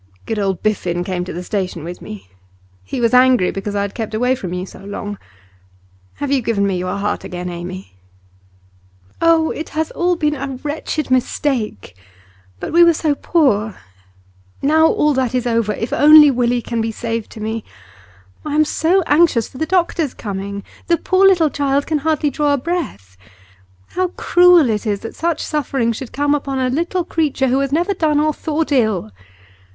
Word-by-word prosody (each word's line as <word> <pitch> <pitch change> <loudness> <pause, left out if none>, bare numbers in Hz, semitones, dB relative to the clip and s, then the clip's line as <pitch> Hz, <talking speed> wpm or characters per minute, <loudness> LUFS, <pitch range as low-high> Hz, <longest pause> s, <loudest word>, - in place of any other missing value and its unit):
'Good 220 -2 -2
old 195 -3 -1
Biffen 180 -5 -1
came 180 -2 -2
to - - -6
the 175 - -6
station 180 -5 -3
with 175 +2 -7
me. 100 -3 -9 0.6
He 95 - -5
was 235 -1 +1
angry 250 -6 +5
because 200 +1 -5
I 200 - +1
had 200 - -5
kept 220 -2 -4
away 250 +3 +2
from 195 -9 -5
you 180 +1 -3
so - - -13
long. 205 0 -6 1.0
Have 285 -1 -4
you 275 -2 +2
given 220 -3 0
me 195 -1 0
your 185 +2 -3
heart 205 +1 -2
again, 180 0 -5
Amy?' 180 - -8 1.3
'Oh, 330 -1 +3
it 315 - -6
has 315 0 -1
all 355 +1 +1
been 300 -3 0
a 270 -2 -5
wretched 300 -1 -3
mistake! 245 - -1 0.6
But - - -5
we 345 +1 +7
were 340 -1 +5
so 305 -1 +1
poor. 235 - +1 0.8
Now 315 +3 +4
all 300 -1 +2
that 255 -2 -1
is 250 -1 0
over; 230 -3 +1
if 225 +3 -4
only 300 0 +8
Willie 245 -1 0
can 235 -1 -2
be 225 0 -2
saved 230 0 -4
to 225 - -10
me! 220 +1 -3 0.8
I 300 -1 -3
am 310 0 +4
so 350 +5 +1
anxious 295 -8 +3
for 255 - -12
the 315 - -1
doctor's 340 -5 0
coming; 200 -1 -5 0.2
the 340 - +3
poor 380 +3 +3
little 340 -6 +4
child 280 0 0
can 310 -2 -1
hardly 305 -1 0
draw 290 +1 +1
a - - +2
breath. 245 - -4 0.7
How 370 0 -1
cruel 355 -3 +4
it 215 +1 -2
is 205 -1 -1
that 225 - -8
such 335 -1 -1
suffering 270 -5 -1
should 230 +2 -6
come 290 +1 +1
upon 275 -2 -2
a 255 -1 0
little 340 +5 -1
creature 295 -6 0
who 260 +2 +2
has 275 0 -1
never 345 +7 +1
done 310 -5 +1
or 305 0 +1
thought 310 +1 -2
ill! 215 - +1
260 Hz, 185 wpm, -18 LUFS, 205-310 Hz, 1.3 s, only